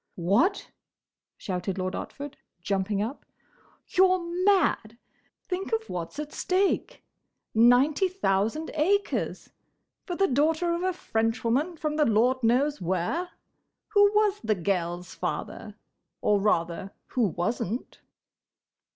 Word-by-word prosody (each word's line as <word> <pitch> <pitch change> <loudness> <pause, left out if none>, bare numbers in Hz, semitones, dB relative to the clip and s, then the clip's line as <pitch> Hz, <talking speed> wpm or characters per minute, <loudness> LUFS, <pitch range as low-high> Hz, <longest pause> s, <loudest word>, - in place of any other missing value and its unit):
"What!" 205 - +1 0.7
shouted 185 -1 -3
Lord 185 0 -2
Otford, 285 0 -6 0.3
jumping 195 +2 -1
up. 245 +7 -6 0.7
"You're 370 0 +4 0.3
mad! 310 - +2 0.5
Think 375 +1 -3
of 445 0 -1
what's 170 +7 -5
at 300 0 -5
stake! 390 +6 0 0.5
Ninety 250 - +5
thousand 305 - -1
acres!—For 365 +1 -3
the 390 - +3
daughter 320 +4 +1
of 340 - -2
a 370 0 +1
Frenchwoman 240 +3 -1
from 305 -1 -2
the 300 - +4
Lord 245 +3 +2
knows 260 +5 +2
where. 185 - -1 0.6
Who 410 -1 +6
was 420 -1 +3
the 220 -1 +1
gel's 175 -1 -2
father?—Or, 205 -1 -4
rather, 180 -2 0 0.2
who 250 - -1
was 180 +6 -2
n't?" 230 +8 -5
255 Hz, 110 wpm, -27 LUFS, -, 0.7 s, Who